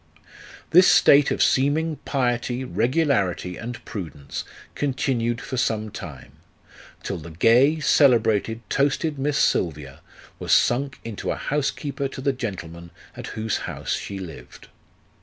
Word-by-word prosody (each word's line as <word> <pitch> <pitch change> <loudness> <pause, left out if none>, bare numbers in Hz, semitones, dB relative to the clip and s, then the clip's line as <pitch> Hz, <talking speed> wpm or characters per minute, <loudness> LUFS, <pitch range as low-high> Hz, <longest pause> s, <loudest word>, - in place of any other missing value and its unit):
This 180 +2 +7
state 140 -1 +6
of - - +1
seeming 150 +4 +1
piety, 125 -1 -1
regularity, 120 - 0
and 120 +2 -7
prudence 80 - -6 0.3
continued 125 -4 -1
for 130 - -5
some 110 -3 -1
time, 80 -10 -9 0.7
till 95 - -4
the 80 - -10
gay, 120 - +4
celebrated, 115 -6 +3
toasted 145 +2 0
Miss 145 +2 0
Silvia 75 -5 0 0.4
was - - 0
sunk 135 +2 +2
into 115 -3 -5
a - - 0
house 145 -1 -1
keeper 140 -2 -4
to 135 - -9
the 140 0 +1
gentleman 85 -8 -6 0.3
at - - -7
whose 110 0 -1
house - - -4
she 100 - -4
lived. 90 -5 -10
120 Hz, 130 wpm, -23 LUFS, 100-140 Hz, 0.7 s, This